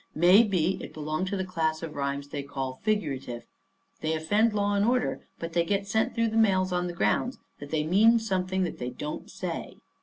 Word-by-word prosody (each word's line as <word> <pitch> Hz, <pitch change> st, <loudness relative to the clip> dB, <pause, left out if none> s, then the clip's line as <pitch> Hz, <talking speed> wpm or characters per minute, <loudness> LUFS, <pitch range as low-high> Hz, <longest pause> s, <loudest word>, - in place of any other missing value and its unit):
May 180 Hz, +6 st, +7 dB
be 190 Hz, -4 st, +1 dB
it -, -, -9 dB
belonged 155 Hz, +4 st, -2 dB
to 200 Hz, -, -2 dB
the 190 Hz, -, -2 dB
class 160 Hz, -3 st, -1 dB
of 160 Hz, -2 st, -5 dB
rhymes 140 Hz, 0 st, -3 dB
they 145 Hz, -, -4 dB
call 135 Hz, -2 st, -5 dB
figurative. 140 Hz, -, -2 dB, 0.5 s
They 160 Hz, +1 st, -1 dB
offend 205 Hz, +9 st, +2 dB
law 205 Hz, -1 st, 0 dB
and 200 Hz, 0 st, +2 dB
order, 250 Hz, +3 st, 0 dB
but 165 Hz, 0 st, -6 dB
they 170 Hz, 0 st, +3 dB
get 200 Hz, +2 st, 0 dB
sent 220 Hz, +3 st, 0 dB
through 230 Hz, 0 st, +2 dB
the 220 Hz, -, -2 dB
mails 190 Hz, -4 st, +3 dB
on 180 Hz, 0 st, 0 dB
the 175 Hz, -, -4 dB
grounds 245 Hz, +8 st, 0 dB, 0.2 s
that 145 Hz, -, -8 dB
they 155 Hz, -1 st, 0 dB
mean 210 Hz, +8 st, +5 dB
something 190 Hz, -4 st, -1 dB
that 175 Hz, -, -4 dB
they 125 Hz, -, -3 dB
don't 150 Hz, +4 st, -6 dB
say. -, -, -5 dB
180 Hz, 210 wpm, -28 LUFS, 155-205 Hz, 0.5 s, May